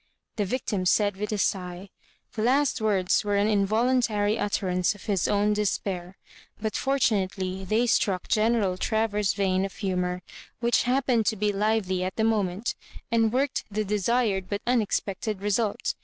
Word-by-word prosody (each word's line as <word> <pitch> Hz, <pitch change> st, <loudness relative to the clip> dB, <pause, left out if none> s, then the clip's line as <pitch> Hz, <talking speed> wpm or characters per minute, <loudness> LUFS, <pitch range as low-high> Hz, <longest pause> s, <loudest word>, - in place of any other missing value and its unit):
the 210 Hz, -, 0 dB
victim 205 Hz, -3 st, -2 dB
said, 205 Hz, +2 st, +2 dB
with 210 Hz, +2 st, -4 dB
a 210 Hz, -, -1 dB
sigh. 180 Hz, -1 st, -2 dB, 0.5 s
The 215 Hz, -, -3 dB
last 265 Hz, +2 st, +2 dB
words 195 Hz, -4 st, +2 dB
were 205 Hz, -1 st, 0 dB
an 200 Hz, +1 st, +2 dB
involuntary 215 Hz, +1 st, +2 dB
utterance 185 Hz, -1 st, 0 dB
of 205 Hz, -, -14 dB
his 195 Hz, -4 st, 0 dB
own 205 Hz, +1 st, +2 dB
despair, 190 Hz, -3 st, -2 dB, 0.4 s
but 215 Hz, 0 st, -3 dB
fortunately 190 Hz, -8 st, 0 dB
they 220 Hz, +5 st, +2 dB
struck 195 Hz, -5 st, +1 dB
General 215 Hz, -4 st, +2 dB
Travers's 215 Hz, -3 st, 0 dB
vein 190 Hz, -2 st, +1 dB
of 195 Hz, -, -5 dB
humour, 180 Hz, -2 st, -2 dB, 0.4 s
which 240 Hz, -1 st, +2 dB
happened 250 Hz, -4 st, +2 dB
to 220 Hz, -, +2 dB
be 210 Hz, 0 st, 0 dB
lively 200 Hz, -3 st, 0 dB
at 185 Hz, 0 st, -3 dB
the 220 Hz, -, 0 dB
moment, 210 Hz, -1 st, 0 dB, 0.4 s
and 225 Hz, -1 st, +3 dB
worked 265 Hz, +3 st, 0 dB
the 215 Hz, +1 st, -2 dB
desired 210 Hz, -1 st, 0 dB
but 205 Hz, +1 st, -4 dB
unex 240 Hz, -4 st, +2 dB
pected 200 Hz, +1 st, -4 dB
result. 205 Hz, +1 st, 0 dB
205 Hz, 155 wpm, -26 LUFS, 190-225 Hz, 0.5 s, and